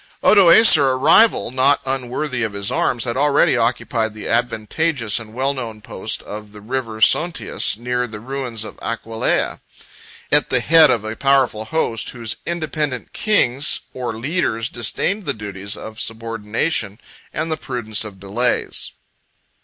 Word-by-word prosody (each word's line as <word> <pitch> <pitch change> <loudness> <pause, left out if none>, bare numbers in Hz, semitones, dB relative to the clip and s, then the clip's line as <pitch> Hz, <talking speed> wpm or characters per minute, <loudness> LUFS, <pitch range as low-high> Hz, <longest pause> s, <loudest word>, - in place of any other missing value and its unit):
] - - -36
Odoacer, 170 - +7
a - - -1
rival 145 - +4
not 135 +2 +3
unworthy 130 0 -3
of 110 -3 -2
his 100 0 -2
arms, 120 -3 0
had 120 -2 -2
already 145 0 +3
occupied 115 -2 0
the 110 - -7
advantageous 120 +2 0
and 110 -2 -10
well 135 +4 -1
known 115 -5 -6
post 105 - -5
of 105 0 -9
the 105 - -11
River 115 0 -4
Sontius, 165 -1 +1
near 125 +1 -2
the 110 -2 -8
ruins 125 -2 -4
of - - -10
Aquileia, 115 -1 -2 0.7
at 150 0 +3
the 125 - +2
head 155 +4 +6
of 115 -4 +1
a 110 +1 -4
powerful 130 -5 +2
host, 115 -5 -2
whose 115 -3 -4
independent 155 -6 -3
kings 150 - +1
18 130 - -9
or 120 -2 -2
leaders 115 -4 -1
disdained 185 - -1
the 140 - -1
duties 100 -2 -5
of 110 +1 -9
subordination 115 0 -3 0.3
and 160 - -3
the - - +1
prudence 120 -8 -3
of 100 -3 -10
delays. 110 +6 -2
120 Hz, 155 wpm, -19 LUFS, 110-140 Hz, 0.7 s, Odoacer